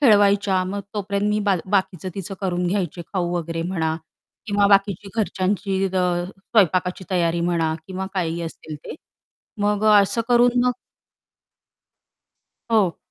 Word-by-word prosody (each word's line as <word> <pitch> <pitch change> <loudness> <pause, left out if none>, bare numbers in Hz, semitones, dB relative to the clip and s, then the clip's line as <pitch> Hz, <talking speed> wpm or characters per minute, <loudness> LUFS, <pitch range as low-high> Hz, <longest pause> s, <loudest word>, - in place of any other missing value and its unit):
खेळवायच्या 205 -6 +4
मग 200 +2 -3
तोपर्यंत 200 0 -1
मी 210 - +1
बा 200 - +3 0.2
बाकीचं 190 -2 0
तिचं 195 0 -5
करून 180 -2 -1
घ्यायचे 175 -2 -2
खाऊ 175 -3 -1
वगैरे 165 0 -3
म्हणा 165 -3 -1 0.5
किंवा 205 -1 +3
बाकीची 200 -1 +2
घरच्यांची 195 -1 -1
अ, 180 -2 0
स्वयंपाकाची 185 -2 0
तयारी 170 -2 +1
म्हणा 170 -2 +1
किंवा 190 0 -4
काहीही 170 -2 -1
असेल 160 -1 -7
ते - - -6 0.7
मग 210 +1 +1
अ, 210 -1 +7
असं 215 +4 -1
करून 245 0 +4
मग 250 - +3 2.0
हो. 205 -7 +3
190 Hz, 135 wpm, -22 LUFS, 175-205 Hz, 2.0 s, अ